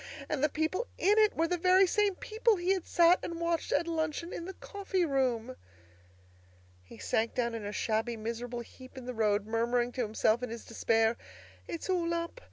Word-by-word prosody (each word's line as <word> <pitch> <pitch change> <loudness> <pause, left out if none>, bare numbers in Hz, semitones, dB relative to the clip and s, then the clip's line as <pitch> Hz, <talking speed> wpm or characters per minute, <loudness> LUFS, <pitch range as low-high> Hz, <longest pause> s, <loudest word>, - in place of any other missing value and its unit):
And 295 -2 -2
the 300 - +4
people 320 - -1
in 415 +3 +4
it 430 -1 +4
were 330 +1 +2
the 355 +1 -1
very 370 +2 +5
same 405 +1 +1
people 445 +3 +1
he 360 +1 +1
had 375 -3 -4
sat 345 +1 +5
and 335 -1 -5
watched 335 -1 -1
at - - +2
luncheon 325 +1 -2
in 340 - -5
the 380 +1 -7
coffee 390 -3 -2
room! 255 -4 0 1.3
He 90 - -14
sank 220 - -1
down 235 -2 0
in 225 -2 -5
a 205 - -3
shabby, 225 +2 -1
miserable 235 +2 -4
heap 255 +3 -14
in 255 - -8
the 250 - -4
road, 210 -2 +1
murmuring 240 +2 0
to 255 - -3
himself 220 +1 +1
in 250 - -3
his 230 0 -7
despair, 225 0 +1 0.5
"It's 170 - -5
all 340 -2 0
up! 335 +8 -4
275 Hz, 195 wpm, -31 LUFS, 230-355 Hz, 1.3 s, very